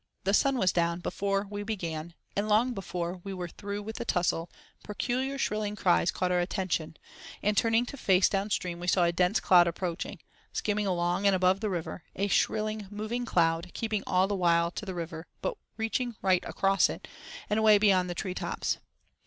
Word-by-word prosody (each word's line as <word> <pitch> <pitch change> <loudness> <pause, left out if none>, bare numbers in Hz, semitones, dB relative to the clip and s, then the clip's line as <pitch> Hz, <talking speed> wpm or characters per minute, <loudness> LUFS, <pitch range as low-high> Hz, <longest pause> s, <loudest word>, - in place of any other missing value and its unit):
The 195 - +1
sun 275 +4 +3
was 190 -6 +3
down 170 0 +1
before 195 +2 -1
we 205 0 -5
began; 170 -6 -4 0.2
and 205 +2 -1
long 230 +4 +3
before 180 -3 -4
we 195 -1 -5
were 180 -1 -4
through 200 +3 -6
with 220 +2 -6
the 240 - -3
tussle, 175 -5 0 0.3
peculiar 260 +6 -2
shrilling 210 -5 -1
cries 175 -3 +3
caught 180 -1 0
our 180 - +3
attention, 175 -3 -2 0.5
and, 210 +1 +2
turning 225 +3 +3
to 280 - -8
face 190 -6 +4
down 195 +1 -1
stream, 180 -4 -2
we 175 - -6
saw 180 0 +4
a 170 - +3
dense 180 +4 +2
cloud 175 -2 +6
approaching—skimming 190 +4 -3
along 175 +2 +1
and 195 - +5
above 185 +1 +3
the 215 0 -1
river: 175 -2 -4
a 200 +2 0
shrilling, 215 0 0
moving 215 +4 -3
cloud, 165 -4 +1
keeping 220 -3 -1
all 185 +1 +3
the 205 - -2
while 170 -2 +2
to 210 - -7
the 190 - -4
river, 165 -1 -6
but - - -2 0.2
reaching 230 +2 -1
right 185 -2 +3
across 195 0 +3
it, - - -7 0.4
and 210 - +1
away 215 -1 +6
beyond 190 -3 +3
the 175 - -3
tree 185 +1 -3
tops. - - -2
195 Hz, 190 wpm, -29 LUFS, 175-210 Hz, 0.5 s, cloud